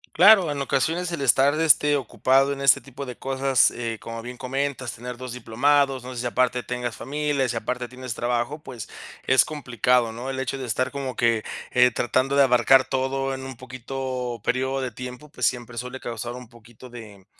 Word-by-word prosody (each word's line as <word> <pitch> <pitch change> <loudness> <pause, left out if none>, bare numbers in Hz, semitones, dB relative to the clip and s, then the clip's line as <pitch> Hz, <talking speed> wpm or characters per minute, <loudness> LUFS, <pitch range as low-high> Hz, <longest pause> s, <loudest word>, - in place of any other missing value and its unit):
Claro. 190 -2 +7
En 140 - -4
ocasiones, 160 +6 0
el 165 - -3
estar, 135 +4 +4
este, 150 -2 +4
ocupado, 135 +1 +2
en 140 - -5
este 140 -4 +5
tipo 135 +1 -8
de 125 - -7
cosas, 135 -1 +2
eh, 115 -2 -4
como 115 +1 -7
bien 125 +2 -8
comentas. 130 -2 -3
Tener 125 +2 -7
2 130 0 -7
diplomados, 130 +3 +1
no 130 0 -7
sé 120 - -4
si 125 - -3
aparte 125 0 +1
tengas 125 -2 -4
familia, 145 -2 -1
si 115 - -3
aparte 120 +2 -3
tienes 125 -1 -6
trabajo, 120 +5 -1
pues, 120 -7 -9 0.4
es 130 -1 +6
complicado, 125 -5 +1
¿no? 120 +4 -7
El 135 - -4
hecho 130 +1 -3
de 130 - -5
estar, 130 +2 -1
como 135 -2 -5
que, 115 -2 +2 0.3
eh, 125 0 +5
tratando 130 +4 0
de 140 - +7
abarcar 130 +1 +5
todo, 135 +1 -1
en 130 0 -6
un 130 -2 -8
poquito 130 0 -5
periodo 130 +1 0
de 130 - -3
tiempo, 125 +5 -9
pues, - - -1
siempre 120 -1 -3
suele 125 +2 -5
causar 120 0 -5
un 125 -2 -10
poquito 120 +1 -15
de 105 -5 -12
130 Hz, 195 wpm, -24 LUFS, 120-135 Hz, 0.4 s, Claro